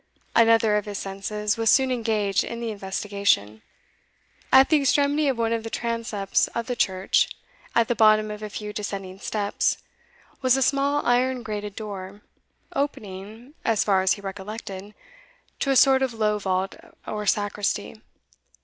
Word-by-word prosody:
Another 225 -2 +5
of 210 - -2
his 205 -1 -5
senses 205 +2 -3
was 225 -1 +2
soon 265 -2 +4
engaged 220 -5 0
in 235 - -6
the 230 -1 -3
investigation. 195 - -1 0.9
At 265 0 +7
the 310 -2 +4
extremity 285 +2 +2
of 265 -3 +1
one 230 0 +1
of 230 -1 -2
the 225 - -5
transepts 230 -4 -1
of 235 - -1
the 250 0 -3
church, 190 -3 +2 0.5
at 230 -1 +4
the - - +1
bottom 215 -2 +4
of 210 0 -7
a 215 - -5
few 210 0 -6
descending 195 -2 -5
steps, 205 -1 0 0.6
was 255 0 +4
a 270 - +2
small 280 +2 +1
iron 250 +1 +2
grated 210 -2 -5
door, 200 -2 -7 0.5
opening, 220 -1 -5
as 225 -3 +2
far 195 -2 +3
as 190 0 +3
he 200 - -8
recollected, 200 0 -7 0.6
to 275 - -1
a 270 - +3
sort 265 0 +6
of 260 -3 -1
low 210 -1 +1
vault 190 -1 -1 0.3
or 210 -1 -4
sacristy. 205 +1 -1
215 Hz, 160 wpm, -24 LUFS, 200-235 Hz, 0.9 s, At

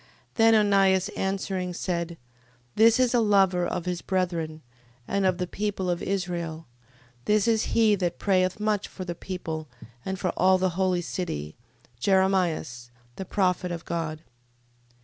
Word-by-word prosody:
Then 225 -1 +5
Onias 195 -3 +3
answering, 190 -2 -3
said: 170 -2 -3 0.6
This 225 +2 +5
is 255 -1 +3
a 240 - +4
lover 195 -5 +3
of 175 - -3
his 180 -1 -2
brethren, 170 -4 -2 0.4
and 200 -1 +1
of 185 -1 +1
the 180 - -1
people 195 -1 -2
of 175 - -2
Israel: 175 -4 -3 0.6
this 210 +1 +2
is 225 -1 +1
he 220 -2 +5
that 180 -4 -1
prayeth 185 -1 +1
much 210 -1 0
for 185 - -8
the 175 - -3
people, 160 -3 -6 0.4
and 190 0 -3
for 180 - 0
all 185 +1 +3
the 185 0 +1
holy 180 0 0
city, 75 - -4 0.4
Jeremias, 180 -9 +1 0.3
the 190 - -5
prophet 180 -2 0
of 170 -1 -6
God. 165 -2 -4
185 Hz, 150 wpm, -26 LUFS, 175-195 Hz, 0.6 s, Then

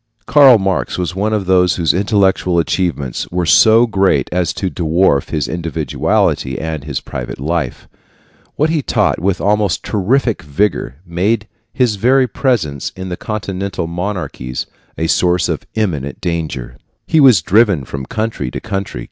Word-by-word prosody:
Karl 135 0 +7
Marx 95 -2 -1
was 90 0 -3
one 105 +3 -1
of 105 -3 -1
those 90 -1 +3
whose 85 -3 +1
intellectual 95 -2 +1
achievements 80 -6 -1
were 90 0 -1
so 110 +7 +6
great 95 - +1
as 90 -2 0
to 95 +1 -3
dwarf 80 -3 +1
his 75 -6 -1
individuality 80 -4 -1
and 80 -2 -4
his 70 -2 -3
private 60 0 -7
life. 75 -2 -3 0.7
What 155 +2 +1
he 160 -2 +1
taught - - +1
with 95 0 0
almost 105 -3 +1
terrific 115 +3 0
vigor 75 -1 -1
made 100 +6 -1 0.2
his 120 -5 +1
very 130 +5 +3
presence 95 - -1
in 95 0 -6
the 90 - -3
Continental 100 -4 -4
monarchies 85 -8 -4 0.3
a 80 - -1
source 90 +1 +2
of - - -4
eminent 80 -11 -2
danger. 80 -8 -4 0.3
He 160 - +2
was 125 - +6
driven 100 - +3
from 65 0 -6
country 110 - -3
to - - -5
country. 95 - -4
90 Hz, 150 wpm, -16 LUFS, 80-105 Hz, 0.7 s, Karl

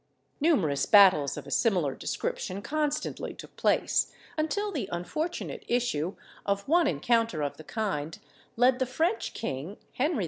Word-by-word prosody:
Numerous 190 - +2
battles 185 -9 +6
of - - -7
a - - -10
similar 180 - +2
description 190 +8 -3
constantly 300 0 -2
took - - -12
place, - - +2 0.2
until 405 +7 -1
the 255 - -3
unfortunate 180 - -3
issue 205 -9 0 0.3
of 200 0 -1
one 335 +2 +4
encounter 225 - +1
of 145 - -3
the 155 - -10
kind 165 -8 -3 0.4
led 250 +2 +4
the 260 - +1
French 330 - -1
king, 165 -1 -4 0.2
Henry 290 +4 0
II. - - -1
225 Hz, 145 wpm, -28 LUFS, -, 0.4 s, battles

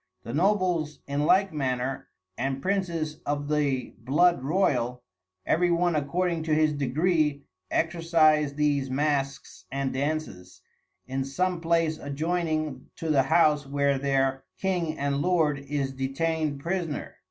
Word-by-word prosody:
The 115 - -6
Nobles 175 -3 +1
in 145 +1 -1
like 195 -1 +4
manner, 130 -2 -2 0.3
and 135 +4 -2
Princes 170 -4 -2
of 145 0 -2
the 145 -4 0
Blood 150 +6 +3
Royal 125 -7 0 0.4
every 175 +2 +2
one 175 0 +2
according 170 +3 0
to 155 -1 +2
his 155 -1 +3
degree 150 +1 +1 0.3
exercise 155 -3 +2
these 145 -2 +1
Masques 135 0 -2
and 135 0 -2
Dances, 135 -11 -3 0.4
in 135 +1 -2
some 175 +6 -1
place 165 -1 +1
adjoyning 155 -1 -2
to 160 -1 -2
the 140 -3 +5
House 150 +1 +3
where 140 -1 +1
their 135 -1 +1
King 175 -5 -1
and 140 0 -1
Lord 160 -5 +2
is 140 -1 -2
detained 145 +2 -1
Prisoner. 170 -2 -3
150 Hz, 130 wpm, -27 LUFS, 135-165 Hz, 0.4 s, the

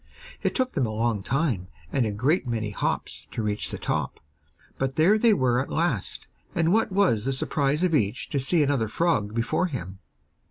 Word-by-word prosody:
It - - -1
took 255 -1 +1
them 135 -8 0
a - - -4
long 110 -1 0
time 120 - -1 0.2
and 125 -4 +1
a - - -2
great 130 - +1
many 110 -3 -2
hops - - -3
to 115 - -4
reach 105 -1 -1
the - - -3
top, - - -2 0.6
but 135 0 -1
there 170 +6 +5
they 230 0 +5
were 130 - +2
at 130 - -3
last, 155 - -1 0.3
and 165 +1 +2
what 225 -2 +2
was 185 - +2
the 135 - +1
surprise 140 +3 0
of 180 -2 +2
each 120 -4 0
to 140 - 0
see 150 +4 +3
another 135 -6 +1
frog 110 -6 0
before 120 +10 +1
him! 95 - -6
135 Hz, 195 wpm, -26 LUFS, 110-165 Hz, 0.6 s, there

